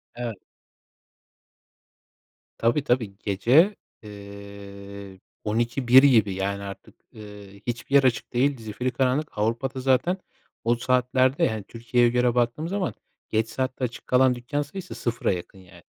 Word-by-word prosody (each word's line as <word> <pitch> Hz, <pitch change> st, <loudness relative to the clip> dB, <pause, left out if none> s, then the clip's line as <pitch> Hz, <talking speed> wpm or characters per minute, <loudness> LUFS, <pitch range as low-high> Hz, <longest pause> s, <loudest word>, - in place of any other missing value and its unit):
Evet. 120 Hz, -3 st, -4 dB, 2.2 s
Tabii, 120 Hz, +5 st, +2 dB
tabii. 120 Hz, -8 st, 0 dB
Gece, 125 Hz, -, +3 dB, 0.3 s
eee, 100 Hz, -1 st, -10 dB, 0.2 s
12-1 120 Hz, +4 st, +4 dB
gibi, 110 Hz, -8 st, +5 dB
yani, 100 Hz, +1 st, -2 dB
artık, 100 Hz, 0 st, -9 dB, 0.2 s
ııı, 105 Hz, -2 st, -11 dB, 0.2 s
hiçbir 120 Hz, +3 st, -2 dB
yer 140 Hz, -, +7 dB
açık 125 Hz, -4 st, 0 dB
değil. 135 Hz, +3 st, +2 dB
Zifiri 115 Hz, +4 st, -3 dB
karanlık. 130 Hz, +4 st, 0 dB
Avrupa'da 115 Hz, +5 st, -1 dB
zaten 135 Hz, +8 st, +2 dB, 0.5 s
o 120 Hz, +1 st, +2 dB
saatlerde, 130 Hz, +2 st, +2 dB
hani, 110 Hz, -2 st, -4 dB
Türkiye'ye 120 Hz, +3 st, +1 dB
göre 125 Hz, 0 st, +2 dB
baktığımız 125 Hz, +7 st, 0 dB
zaman 195 Hz, -1 st, -1 dB, 0.4 s
geç 110 Hz, +1 st, 0 dB
saatte 130 Hz, +3 st, -3 dB
açık 120 Hz, -1 st, -4 dB
kalan 130 Hz, 0 st, +4 dB
dükkân 125 Hz, +4 st, -3 dB
sayısı 180 Hz, +5 st, -7 dB
sıfıra 120 Hz, -1 st, -1 dB
yakın 95 Hz, +1 st, -6 dB
yani. 90 Hz, -2 st, -17 dB
120 Hz, 130 wpm, -25 LUFS, 105-130 Hz, 2.2 s, yer